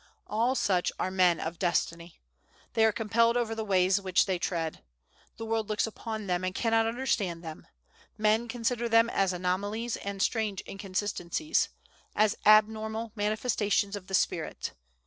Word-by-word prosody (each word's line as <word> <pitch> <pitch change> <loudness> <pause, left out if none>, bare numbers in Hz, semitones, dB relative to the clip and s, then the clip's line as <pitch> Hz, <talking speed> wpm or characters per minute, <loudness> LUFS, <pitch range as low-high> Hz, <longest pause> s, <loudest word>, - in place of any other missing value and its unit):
All 235 +5 +1
such 185 -7 +1
are 185 - -1
men 180 -2 +3
of 165 +1 -5
Destiny. 170 -1 -1 0.5
They 225 -1 +4
are 220 - +4
compelled 230 +2 +2
over 230 -2 0
the 225 0 -3
ways 190 -1 +2
which 185 -2 +2
they 190 -3 -1
tread. 165 - -2 0.6
The 225 - -5
world 225 -1 -1
looks 215 - +1
upon 220 -1 -6
them, 180 -1 -1
and 185 0 -2
cannot 225 -1 +2
understand 215 -8 -1
them; 160 -1 -9 0.5
men 215 +2 +2
consider 235 0 -1
them 230 +1 +4
as 195 -1 +2
anomalies 200 +6 -2
and 200 0 -6
strange 210 -2 0
inconsistencies; 200 - -1 0.5
as 215 0 +3
abnormal 220 +1 +3
manifestations 210 -1 0
of 190 -2 -8
the 190 - 0
spirit. - - -1
210 Hz, 150 wpm, -29 LUFS, 185-225 Hz, 0.6 s, They